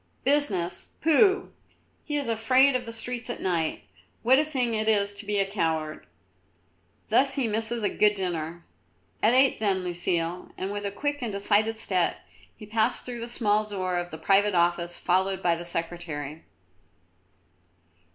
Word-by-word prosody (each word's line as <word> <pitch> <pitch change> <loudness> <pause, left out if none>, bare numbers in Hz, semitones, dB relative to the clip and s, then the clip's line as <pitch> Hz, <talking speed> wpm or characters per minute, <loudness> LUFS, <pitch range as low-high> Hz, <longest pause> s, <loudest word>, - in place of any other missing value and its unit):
"Business, 215 -12 +1
pooh! 380 +4 +3 0.5
He 295 -1 -2
is 285 -3 -2
afraid 255 +4 +4
of 250 -1 -2
the - - -5
streets 240 +2 -1
at 240 - -4
night. 170 -4 -1 0.4
What 260 +3 +5
a - - +3
thing 260 -6 -1
it 215 0 0
is 205 -2 +2
to 200 +1 -10
be 205 0 0
a 195 - +2
coward! 160 -6 -2 1.0
Thus 270 +5 +3
he 270 -5 0
misses 225 +1 -1
a 205 - +2
good 210 0 +3
dinner. 170 -3 -4 0.6
At 230 +3 +4
eight 265 0 +4
then, 195 -3 +1
Lucile." 175 0 -2
And 190 +1 -3
with 205 0 -4
a - - -4
quick 290 +6 -3
and 235 -3 -3
decided 210 +2 +1
step 185 -5 0 0.4
he 215 - -10
passed 220 +3 0
through 245 -1 -6
the 230 - -5
small 215 -3 +1
door 185 -4 -3
of 175 0 -5
the 160 - -8
private 195 +4 +3
office 175 0 +1
followed 190 +2 0
by 175 - +3
the 170 - -7
Secretary. 165 -3 -5
205 Hz, 165 wpm, -26 LUFS, 175-240 Hz, 1.0 s, What